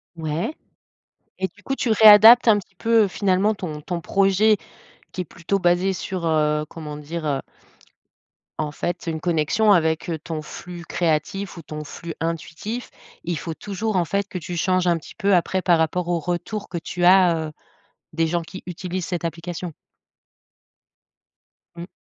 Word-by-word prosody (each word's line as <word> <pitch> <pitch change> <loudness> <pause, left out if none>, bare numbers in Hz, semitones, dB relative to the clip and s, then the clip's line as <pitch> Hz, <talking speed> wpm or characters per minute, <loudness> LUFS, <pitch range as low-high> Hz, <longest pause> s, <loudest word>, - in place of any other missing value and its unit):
Ouais. 160 - -3 0.8
Et 190 - -1
du 205 - -22
coup 270 - -2
tu 250 - -1
réadaptes 220 +2 +9
un 215 -2 +6
petit 195 -1 -11
peu 225 0 +3
finalement 195 +2 +1
ton 160 -7 -6
ton 175 +3 -4
projet 195 +4 +3 0.6
qui 185 - -3
est - - -2
plutôt 170 +4 -3
basé 180 +1 +2
sur, 185 -1 -4
heu, 150 -1 +1
comment 150 -2 -8
dire? 155 +2 -6
Heu 140 -3 0 1.2
en 150 -1 -1
fait 175 +3 -4
une 160 -2 -3
connexion 175 +6 +2
avec, 160 -3 +2
heu, 165 - -1
ton 155 0 -5
flux 175 +3 -9
créatif 175 +4 -1
ou - - -7
ton 150 -1 -7
flux 165 +3 -8
intuitif. 165 +8 -4 0.3
Il 170 -1 -2
faut 165 +2 -5
toujours 205 +4 -3
en 175 - +2
fait 200 +4 -1
que 185 - -5
tu 175 +1 -6
changes 185 +1 +1
un 170 - +3
petit 160 - -12
peu 200 -2 +2
après 185 +2 +1
par 175 -2 +4
rapport 160 +2 0
au 175 -1 0
retour 180 +5 -4
que 170 - -4
tu 175 +2 -4
as, 180 -2 +6
heu, - - -12 0.6
des 165 0 +1
gens 170 +1 -1
qui 190 +3 -10
utilisent 180 0 -4
cette 175 -2 -3
application. 170 +1 -5 2.0
Mmh. 170 +1 -8
175 Hz, 170 wpm, -23 LUFS, 165-195 Hz, 2.0 s, réadaptes